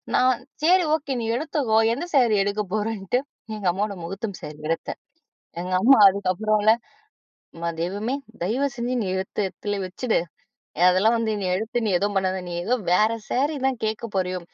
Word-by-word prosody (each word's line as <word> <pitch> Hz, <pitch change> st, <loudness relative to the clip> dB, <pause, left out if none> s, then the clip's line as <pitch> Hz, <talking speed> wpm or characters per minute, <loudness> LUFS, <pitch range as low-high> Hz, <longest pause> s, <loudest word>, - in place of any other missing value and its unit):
நான் 255 Hz, -1 st, +3 dB, 0.2 s
"சேரி, 360 Hz, +3 st, +5 dB
ஓகே, 280 Hz, -3 st, -3 dB
நீ 225 Hz, -, -3 dB
எடுத்துக்கோ. 275 Hz, -7 st, +1 dB, 0.2 s
எந்த 340 Hz, +6 st, -5 dB
ஸேரி 240 Hz, -6 st, +5 dB
எடுக்க 205 Hz, +1 st, -1 dB
போறேன்னுட்டு" 215 Hz, +2 st, -1 dB, 0.3 s
எங்க 205 Hz, -3 st, -3 dB
அம்மாவோட 200 Hz, +1 st, -2 dB
முஹூர்த்தம் 195 Hz, +3 st, -5 dB
ஸேரி 150 Hz, 0 st, -8 dB
எடுத்தேன். 165 Hz, -, -3 dB, 0.6 s
எங்க 180 Hz, +1 st, -4 dB
அம்மா 270 Hz, +2 st, +7 dB
அதுக்கப்புறம்ல, 205 Hz, +3 st, +1 dB, 0.9 s
"எம்மா 170 Hz, 0 st, -3 dB
தெய்வமே! 205 Hz, +8 st, -2 dB, 0.3 s
தயவுசெஞ்சு 240 Hz, +3 st, -1 dB
நீ -, -, -3 dB
எடுத்து 190 Hz, +2 st, -4 dB
எடத்துலே 205 Hz, +2 st, -4 dB
வச்சுடு. 225 Hz, +6 st, 0 dB, 0.7 s
அதெல்லாம் 190 Hz, +5 st, +3 dB
வந்து 225 Hz, -1 st, 0 dB
நீ 190 Hz, -, -2 dB
எடுத்து, 225 Hz, +5 st, -3 dB
நீ -, -, +1 dB
எதுவும் 205 Hz, +2 st, -1 dB
பண்ணாத. 190 Hz, 0 st, 0 dB
நீ 175 Hz, -, -5 dB
ஏதோ 245 Hz, +7 st, +1 dB, 0.2 s
வேற 215 Hz, +5 st, +4 dB, 0.2 s
ஸேரி 285 Hz, +5 st, +1 dB
தான் 265 Hz, -2 st, -1 dB
கேட்க 220 Hz, +1 st, -2 dB
போறியோ 185 Hz, -1 st, 0 dB
215 Hz, 155 wpm, -24 LUFS, 190-245 Hz, 0.9 s, அம்மா